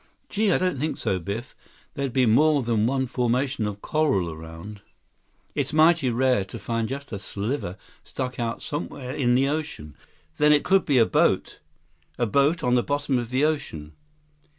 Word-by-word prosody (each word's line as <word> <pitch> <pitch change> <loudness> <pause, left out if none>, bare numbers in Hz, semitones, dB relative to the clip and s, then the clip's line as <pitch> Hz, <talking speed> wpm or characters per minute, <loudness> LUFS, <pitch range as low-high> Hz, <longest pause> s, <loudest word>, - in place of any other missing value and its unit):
"Gee, 210 0 +1
I - - +4
don't 180 -7 -1
think 155 +3 -2
so, 95 - -1
Biff. 100 +9 -6 0.4
There'd 140 -3 -2
be 130 0 +3
more 145 +5 +4
then 115 -2 +1
one 130 +1 0
formation 125 -1 0
of 100 0 -7
coral 135 - +1
around. 80 +6 -10 0.7
It's - - -2
mighty 160 -3 +4
rare 125 -3 +2
to 95 - -9
find 115 -1 -2
just 140 +1 -6
a 100 - -4
sliver 100 -1 -4 0.3
stuck 125 -2 -5
out 115 -1 -3
somewhere 140 -4 -5
in 125 -4 +2
the 135 +2 +3
ocean." 145 - -4 0.4
"Then 150 0 +6
it 145 - +3
could 190 -2 +3
be 140 - +2
a 115 - +6
boat! 90 - +1 0.6
A 120 - +1
boat 140 +8 +2
on 125 - +2
the 125 - +4
bottom 145 -1 -1
of 120 -2 -5
the 130 +3 +1
ocean." 80 - -3
125 Hz, 175 wpm, -25 LUFS, 110-145 Hz, 0.7 s, Then